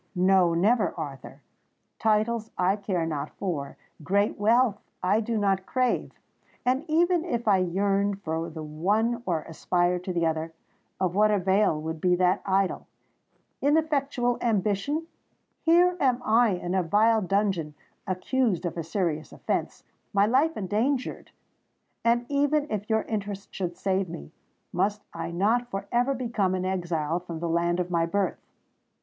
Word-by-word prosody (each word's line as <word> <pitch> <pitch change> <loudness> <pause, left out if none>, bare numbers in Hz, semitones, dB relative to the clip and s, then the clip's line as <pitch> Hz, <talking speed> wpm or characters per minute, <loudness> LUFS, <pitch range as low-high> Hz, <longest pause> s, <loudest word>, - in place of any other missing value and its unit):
No—never, 185 +4 +3
Arthur! - - -7 0.6
Titles 220 +1 +1
I 185 +2 +2
care 195 -5 -2
not 150 -2 -3
for—great 185 +4 -2
wealth 225 0 +3 0.2
I 200 +4 +3
do 225 0 -2
not 195 -2 +1
crave;—and 255 +1 -2
even 340 +2 +2
if 240 -10 -3
I 200 -2 +5
yearned 200 +2 0
for 160 +1 -2
the 160 -1 -7
one 205 +10 0
or 165 -4 0
aspired 175 +2 0
to 185 - -2
the 170 -2 0
other, 160 0 -2 0.5
of 185 -2 0
what 210 +2 +4
avail 195 -4 +2
would 160 0 -5
be 180 -1 +3
that 180 0 +2
idle—ineffectual 275 - -1
ambition? 220 - 0 0.6
Here 350 +2 +4
am 255 -3 +2
I 230 +2 +4
in 180 0 -3
a 190 - +2
vile 215 +6 +3
dungeon—accused 190 - -1
of 175 - -3
a 165 - -2
serious 165 -3 -2
offence—my 200 -1 -2
life 275 +9 +2
endangered! 225 +7 -1 0.7
And, 235 +1 +2
even 290 +2 +1
if 210 0 -3
your 220 -1 +2
interest 205 -2 -5
should 175 -2 -4
save 190 -2 0
me, 70 - -8 0.4
must 205 +4 0
I - - -4
not 215 +8 +1
for 195 -2 -4
ever 245 +3 +2
become 225 -7 0
an 185 0 -2
exile 175 -3 -1
from 175 -2 -7
the 170 - -2
land 170 +1 +1
of 180 0 -2
my 165 -1 +1
birth? 200 +3 -1
195 Hz, 140 wpm, -27 LUFS, 175-235 Hz, 0.7 s, I